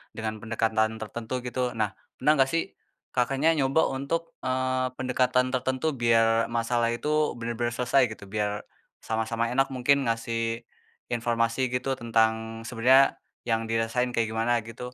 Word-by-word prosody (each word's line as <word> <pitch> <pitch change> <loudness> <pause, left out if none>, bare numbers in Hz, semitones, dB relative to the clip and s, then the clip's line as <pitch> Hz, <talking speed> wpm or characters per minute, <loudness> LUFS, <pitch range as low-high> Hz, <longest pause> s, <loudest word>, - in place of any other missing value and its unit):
dengan 110 -1 -4
pendekatan 110 0 0
tertentu, 110 +3 -6
gitu. 125 -1 -2
Nah, 105 -3 0 0.3
pernah 150 - +3
nggak 135 0 +4
sih 165 - +2 0.5
Kakaknya 135 +5 +2
nyoba 135 +3 +3 0.2
untuk, 165 +5 -3
eee, 130 0 0
pendekatan 125 0 +1
tertentu 130 +3 0
biar 115 -3 +3
masalah 115 0 +1
itu 150 +3 0
bener-bener 120 +1 -2
selesai, 125 +3 +3
gitu? 100 - -14
Biar 105 0 -1 0.4
sama-sama 115 +1 -1
enak 135 +2 +2
mungkin 135 +2 +3
ngasih 115 0 -1 0.5
informasi 115 0 0
gitu, 125 +2 -1
tentang 115 -1 0
sebenernya 130 +3 +4 0.3
yang 115 -1 +1
dirasain 115 +2 0
kayak 115 -1 +1
gimana, 115 +2 +1
gitu? 115 +3 -8
120 Hz, 135 wpm, -27 LUFS, 115-130 Hz, 0.5 s, nggak